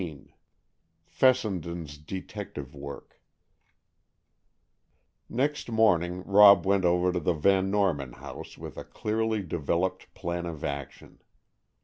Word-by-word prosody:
XV 80 -6 -8 0.7
FESSENDEN'S 85 - 0
DETECTIVE 90 -4 -7
WORK 70 -1 -10 2.1
Next 140 +3 -1
morning 90 -6 +2
Rob 100 0 +7
went 95 -1 +2
over 90 +1 +3
to 90 - 0
the 85 +2 +1
Van 95 +4 +2
Norman 90 -11 0
house - - -10
with - - -9
a - - -6
clearly 110 -1 -2
developed 85 +2 -2
plan 85 0 -3
of 80 -3 -7
action. 70 -2 -6
90 Hz, 105 wpm, -28 LUFS, 80-100 Hz, 2.1 s, Rob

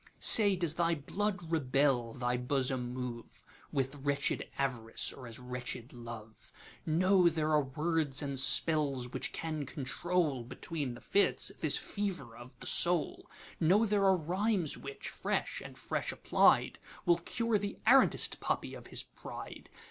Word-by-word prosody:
Say, 205 -3 +7
does 170 -4 0
thy 170 0 +1
blood 180 +3 -3
rebel, 135 -5 +1
thy 125 -1 -1
bosom 125 -1 -1 0.8
moveWith 135 +1 -2
wretched 140 0 -1
Av'rice, 120 -5 -1
or 130 -2 -10
as 115 - -8
wretched 125 -1 -6
Love? 115 -2 -10 0.4
Know 180 +2 +4
there 155 -1 -1
are 150 -1 +4
words 150 +1 -1
and 140 -2 -1
spells 140 -3 +5
which - - -3
can 155 -2 -4
control, 150 0 -1
Between 140 +1 -5
the - - -13
fits, 200 - +1
this - - +3
fever 180 - -4
of 120 +2 -13
the - - -10
soul; 170 -4 +1 0.3
Know 190 +7 +4
there 205 -2 +1
are 190 -1 +5
rhymes 180 +1 -1
which, 140 0 -8
fresh - - -2
and - - -11
fresh - - -3
applied, - - +3 0.3
Will 175 -1 +4
cure 230 +4 -1
the 200 0 -5
arrant'st 265 +3 +4
puppy - - -2
of - - -10
his - - -3
pride. - - -10
150 Hz, 145 wpm, -32 LUFS, 130-175 Hz, 0.8 s, Say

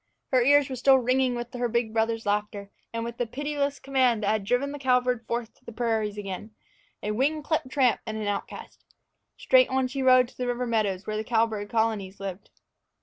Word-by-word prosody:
Her 255 -2 +4
ears 285 +2 +5
were 260 - -5
still 265 +2 +5
ringing 255 0 +1
with 240 +1 -6
her 245 -1 -1
big 235 -1 -1
brothers' 225 0 0
laughter, 205 -1 -2 0.2
and 230 0 -3
with 235 0 -6
the 245 - 0
pitiless 285 +2 -2
command 255 -5 +1
that 200 - +1
had 215 -2 0
driven 245 +6 0
the 290 - -7
cowbird 250 -3 +1
forth 235 -1 -3
to - - -31
the 235 - -9
prairies 220 -3 -1
again 205 +2 -6 0.5
a 210 - -1
wing 290 +7 0
clipped 310 -3 -1
tramp 260 -4 +2
and 220 0 -3
an 215 - -3
outcast! 205 -1 -5 0.5
Straight - - +4
on 260 0 +1
she 270 +2 -4
rode 255 -1 +5
to - - -22
the 250 - -2
river 245 0 -1
meadows 205 -5 -1
where 215 0 -3
the 215 - -2
cowbird 220 -2 0
colonies 220 -4 -1
lived. 195 -1 -7
235 Hz, 205 wpm, -26 LUFS, 215-260 Hz, 0.5 s, ears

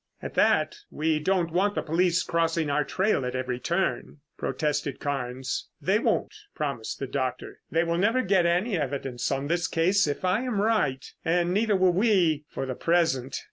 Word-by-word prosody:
"At - - -7
that, - - +2
we 155 0 0
don't 175 0 0
want 200 +4 +1
the - - -1
police 175 +2 +2
crossing 165 -2 0
our 150 +1 +2
trail 190 +2 0
at 125 0 -3
every 125 -1 -2
turn," 170 +3 -1 0.2
protested 145 +1 -2
Carnes. 130 -2 -3
"They 195 +3 +2
won't," 235 - 0 0.2
promised 140 -8 -3
the 135 - -3
doctor. 130 -1 -4
"They 165 +1 +2
will 170 0 -1
never 230 +6 +2
get 185 -2 +3
any 185 +6 +1
evidence 135 -3 -3
on 135 0 -1
this 170 +3 0
case, 185 +3 +2
if 145 +5 -3
I 185 +5 +2
am 250 -5 -2
right, 205 -12 +1 0.2
and 175 +1 +1
neither 210 +1 +2
will 185 -1 +4
we 175 -7 +2
for - - -4
the 130 - -3
present. 150 -4 +1
165 Hz, 180 wpm, -26 LUFS, 140-185 Hz, 0.2 s, will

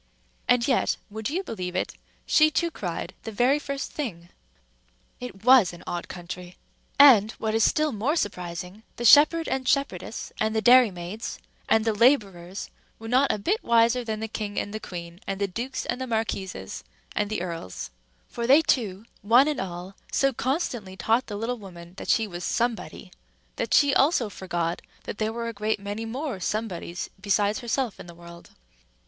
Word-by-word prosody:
And 245 -1 +3
yet 260 - +2
(would 220 +2 -4
you 360 +6 -2
believe 185 - -5
it?) - - -1 0.3
she 310 0 +5
too 335 +2 0
cried 175 - -5
the 225 - -6
very 250 +7 +3
first 280 -1 -5
thing. 175 - -5 0.9
It 225 -4 -9
was 250 -9 +6
an 175 - -12
odd 175 0 -4
country! 180 0 -8 0.4
And, 225 -7 +7
what 220 -1 -3
is 225 0 +3
still 305 +5 +2
more 245 +7 0
surprising, 180 - -4
the 240 - -4
shepherd 305 +6 +7
and 260 -1 -2
shepherdess 230 -8 -1
and 220 0 0
the 220 - +2
dairymaids 215 -4 +3 0.3
and 220 0 +4
the 225 - +2
laborers 200 -6 +1 0.3
were 225 - -9
not 260 +4 +3
a - - -1
bit 390 - -1
wiser 235 +1 +3
than 220 -2 -4
the 220 - -2
king 210 -2 -5
and 205 - -4
the 215 - -3
queen 175 -4 -8
and 195 0 -3
the 200 - +1
dukes 235 +8 -4
and 250 +2 -3
the 260 - -3
marquises 195 - -3 0.3
and 210 -1 0
the 215 -4 -2
earls; 165 - -6 0.4
for 235 0 -4
they 285 +5 +7
too, 215 -8 0 0.2
one 240 +7 +5
and 300 -2 -1
all, 180 +1 -6 0.2
so 275 -1 +2
constantly 240 - -2
taught 230 +5 +1
the 210 - -5
little 235 +3 -3
woman 175 -3 -11
that - - -7
she 225 - +3
was 175 -3 -7
Somebody, 235 +3 -2 0.5
that - - -2
she 285 -1 +5
also 270 -6 +3
forgot 175 -3 -3 0.2
that - - -7
there 215 0 0
were 230 0 -4
a 230 - -4
great 215 0 -1
many 205 +3 -5
more 250 -1 -4
Somebodies 185 -4 -3
besides 205 +1 +1
herself 240 -1 -2
in - - -10
the 170 - -11
world. 170 0 -13
220 Hz, 180 wpm, -26 LUFS, 185-250 Hz, 0.9 s, And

